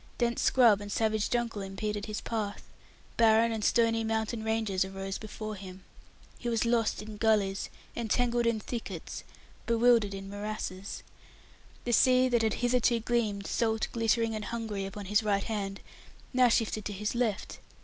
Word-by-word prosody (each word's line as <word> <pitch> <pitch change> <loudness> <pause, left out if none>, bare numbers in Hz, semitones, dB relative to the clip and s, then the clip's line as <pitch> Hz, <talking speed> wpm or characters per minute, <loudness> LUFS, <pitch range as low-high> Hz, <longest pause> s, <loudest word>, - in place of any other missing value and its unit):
Dense 235 -1 0
scrub 230 -6 +5
and 205 0 -7
savage 220 0 +1
jungle 235 -4 -1
impeded 205 +2 -4
his 215 -1 -4
path; 215 -3 -3 0.5
barren 230 0 +5
and 220 -2 -3
stony 225 0 +3
mountain 220 0 -1
ranges 220 -4 0
arose 195 0 -5
before 215 0 -6
him. 190 -2 -10 0.6
He 240 - -3
was 230 0 +1
lost 230 -2 +1
in 215 0 -8
gullies, 205 -3 +1 0.3
entangled 235 +1 +1
in 230 -2 +1
thickets, 230 +2 -6 0.4
bewildered 230 -3 +4
in 195 0 -7
morasses. 205 -1 -5 0.8
The 240 - 0
sea 255 +1 +5
that 240 -2 +3
had 220 -1 +1
hitherto 245 -1 +3
gleamed, 215 -4 -1
salt, 220 0 0
glittering, 230 0 +1
and 215 -1 -4
hungry 220 -4 -3
upon 200 +1 -7
his 210 +3 +2
right 200 -2 +1
hand, 200 -3 -3 0.5
now 255 -1 +5
shifted 220 -2 +1
to 210 - -3
his 210 +2 -2
left. 235 -4 -2
220 Hz, 155 wpm, -30 LUFS, 205-230 Hz, 0.8 s, scrub